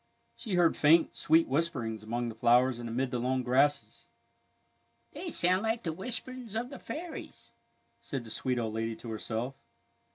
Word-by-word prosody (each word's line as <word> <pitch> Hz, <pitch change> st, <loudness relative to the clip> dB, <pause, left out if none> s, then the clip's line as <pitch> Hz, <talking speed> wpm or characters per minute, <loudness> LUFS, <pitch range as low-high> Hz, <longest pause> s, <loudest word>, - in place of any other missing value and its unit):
She 210 Hz, -6 st, -3 dB
heard 175 Hz, -2 st, +4 dB
faint, 160 Hz, +2 st, +5 dB
sweet 160 Hz, +2 st, +3 dB
whisperings 130 Hz, -7 st, -1 dB
among 120 Hz, +2 st, -2 dB
the -, -, -6 dB
flowers 120 Hz, +2 st, +3 dB
and 120 Hz, -1 st, -5 dB
amid 125 Hz, +3 st, -1 dB
the 125 Hz, -, -1 dB
long 130 Hz, +1 st, 0 dB
grasses. 135 Hz, +4 st, +1 dB, 0.5 s
" -, -, -42 dB
They 360 Hz, -, -5 dB
sound 185 Hz, -, +2 dB
like 225 Hz, +1 st, -1 dB
the 165 Hz, -, -2 dB
whisperings 240 Hz, +4 st, -5 dB
of 245 Hz, +4 st, -2 dB
the 270 Hz, -, -8 dB
fairies," 330 Hz, +1 st, -8 dB, 0.5 s
said 135 Hz, -3 st, -4 dB
the 110 Hz, -, -8 dB
sweet 125 Hz, +2 st, 0 dB
old 115 Hz, -2 st, -2 dB
lady 115 Hz, 0 st, -2 dB
to 115 Hz, -, -8 dB
herself. 110 Hz, +4 st, -3 dB
135 Hz, 170 wpm, -30 LUFS, 120-185 Hz, 0.5 s, faint